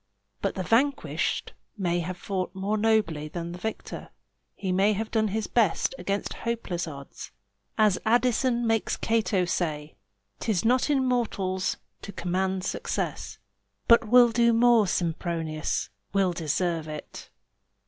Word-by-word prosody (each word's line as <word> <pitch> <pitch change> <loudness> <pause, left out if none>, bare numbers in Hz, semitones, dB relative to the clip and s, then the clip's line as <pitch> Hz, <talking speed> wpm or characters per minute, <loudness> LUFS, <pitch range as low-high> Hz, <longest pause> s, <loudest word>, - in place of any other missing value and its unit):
But - - -1
the 185 - -2
vanquished 265 +8 0 0.2
may 175 -3 0
have 180 +2 -4
fought 185 -1 -3
more 195 +3 -1
nobly 210 -9 +1
than 170 +2 -5
the 175 - -8
victor; 220 +3 -5 0.5
he 190 -2 -3
may 195 +3 +3
have 220 +2 -3
done 220 -1 +2
his 215 +1 -2
best 220 -2 +1
against 200 0 -2
hopeless 210 -7 -2
odds. 140 -3 -9 0.5
As 210 -3 +4
Addison 240 +1 +2
makes 225 -1 +1
Cato 215 -5 +1
say, 155 - -2 0.4
"'Tis 215 -3 0
not 250 +5 +3
in 270 -3 +2
mortals 195 -7 0 0.2
to 200 - -7
command 185 0 -1
success, - - -3 0.5
But 230 -1 +6
we'll 240 +1 +7
do 235 0 +4
more, 230 -2 +5
Sempronius, 165 - -2 0.2
we'll 195 -2 +2
deserve 165 0 -1
it." 150 -1 -8
195 Hz, 135 wpm, -27 LUFS, 175-225 Hz, 0.5 s, we'll